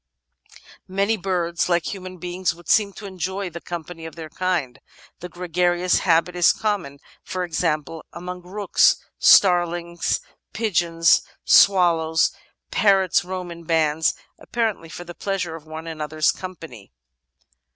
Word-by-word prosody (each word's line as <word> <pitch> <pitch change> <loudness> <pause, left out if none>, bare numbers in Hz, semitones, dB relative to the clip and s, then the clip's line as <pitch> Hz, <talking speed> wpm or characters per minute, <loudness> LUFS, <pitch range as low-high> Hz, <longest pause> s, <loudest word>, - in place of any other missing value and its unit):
Many 200 +4 +1
birds, 180 -4 -1
like 175 +1 0
human 185 -1 -8
beings, 180 +1 -2
would 170 -2 -17
seem 210 -2 +3
to 205 - -10
enjoy 190 0 -4
the 170 +1 -8
company 165 -1 -7
of 160 - -11
their 160 -2 -9
kind. 175 -9 -2 0.4
The 180 - -7
gregarious 175 0 +1
habit 170 0 +2
is 175 -1 +5
common, 200 -10 -2 0.2
for 185 -1 -4
example, 160 -1 -2
among 180 +1 -7
rooks, 195 +2 +3 0.2
starlings, 175 -2 +4 0.3
pigeons, 170 -6 +2 0.2
swallows; 165 -4 +4 0.4
parrots 195 -5 +3
roam 180 -1 -5
in 170 0 -10
bands, 160 -1 +1 0.2
apparently 220 -8 -2
for 170 +3 -8
the 175 0 -9
pleasure 180 -3 -3
of 160 -1 -12
one 160 +1 -7
another's 155 -1 0
company. 165 - -10
175 Hz, 130 wpm, -22 LUFS, 165-185 Hz, 0.4 s, is